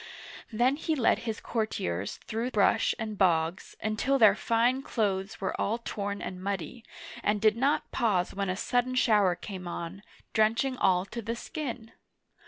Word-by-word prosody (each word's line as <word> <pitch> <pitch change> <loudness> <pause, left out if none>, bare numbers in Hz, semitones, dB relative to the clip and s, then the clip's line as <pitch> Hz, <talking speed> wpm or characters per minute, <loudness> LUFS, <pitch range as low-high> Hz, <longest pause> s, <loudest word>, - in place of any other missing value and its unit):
Then 245 +5 +2
he 320 0 -1
led 250 -6 +3
his 220 - -3
courtiers 100 - -2
through 230 +3 -2
brush 220 0 +3
and 215 -3 -5
bogs 170 -1 +1
until 220 +6 +1
their 215 -5 +7
fine 235 +4 +1
clothes 200 -6 -1
were 190 - -2
all 220 +3 0
torn 205 -3 -4
and 185 0 -6
muddy, 195 +3 -4 0.4
and 210 0 +1
did 215 0 +4
not 270 +5 +1
pause 195 -6 +1
when 195 -1 -2
a 185 - 0
sudden 245 +5 0
shower 210 -7 +4
came 185 -1 -7
on, 170 +3 -5 0.3
drenching 230 +4 +2
all 185 -5 +2
to 235 +4 -6
the 230 +2 -3
skin. 240 -4 -6
215 Hz, 160 wpm, -29 LUFS, 195-235 Hz, 0.4 s, their